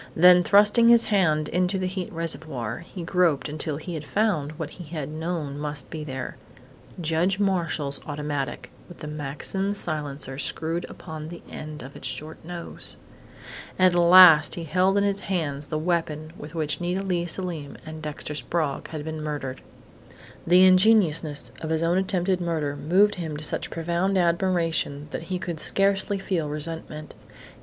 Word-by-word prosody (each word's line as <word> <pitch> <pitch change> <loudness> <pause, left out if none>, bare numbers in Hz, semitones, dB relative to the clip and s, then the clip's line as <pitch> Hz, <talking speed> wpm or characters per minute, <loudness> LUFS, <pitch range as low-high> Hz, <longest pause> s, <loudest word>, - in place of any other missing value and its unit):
Then 180 +2 +7
thrusting 210 +5 +5
his 235 -1 +6
hand 155 -6 +2
into 180 +2 +1
the 185 - -2
heat 185 -1 -4
reservoir, 155 -9 -3
he 175 +1 -9
groped 170 -4 +1
until 150 0 -2
he 170 +3 -7
had 155 -2 -5
found 155 -5 0
what 155 -1 -6
he 180 - -9
had 150 -2 -5
known 155 -2 -4
must 150 -2 -5
be 155 -2 -5
there 130 -3 -6 0.6
Judge 170 +4 +1
Marshall's 165 -8 0
automatic, 145 -2 -4 0.2
with 175 - -12
the 155 - -8
Maxim 150 +7 -2
silencer 145 -6 -3
screwed 165 +5 -2
upon 160 -2 -8
the 170 0 -10
end 155 -2 -8
of 135 +2 -11
its - - -5
short 155 +1 -5
nose. 170 0 -4 0.8
At 185 -1 +5
last 175 -3 +8
he 170 - -5
held 185 +5 +2
in 200 - +3
his 200 -1 +1
hands 150 -8 -2
the 155 - -2
weapon 155 -1 -2
with 150 0 -10
which 155 0 -1
Nita 180 +2 -1
Leigh 175 -3 -1
Selim 170 -5 -5
and 155 0 -8
Dexter 150 -1 -5
Sprague 150 -1 -2
had 155 -2 -6
been 160 -1 -5
murdered. 145 -4 -4 0.9
The 180 +2 +7
ingeniousness 185 -6 +3
of 160 - -4
his 160 0 0
own 175 +2 +2
attempted 185 -1 0
murder 155 -4 -1
moved 180 +9 +3
him 155 -3 -4
to 150 - -6
such - - 0
profound 170 +4 -1
admiration 170 -4 0
that 165 - -5
he 185 - -1
could 170 -3 -4
scarcely 195 +2 +2
feel 175 -6 -2
resentment. 155 0 -5
165 Hz, 165 wpm, -25 LUFS, 150-180 Hz, 0.9 s, last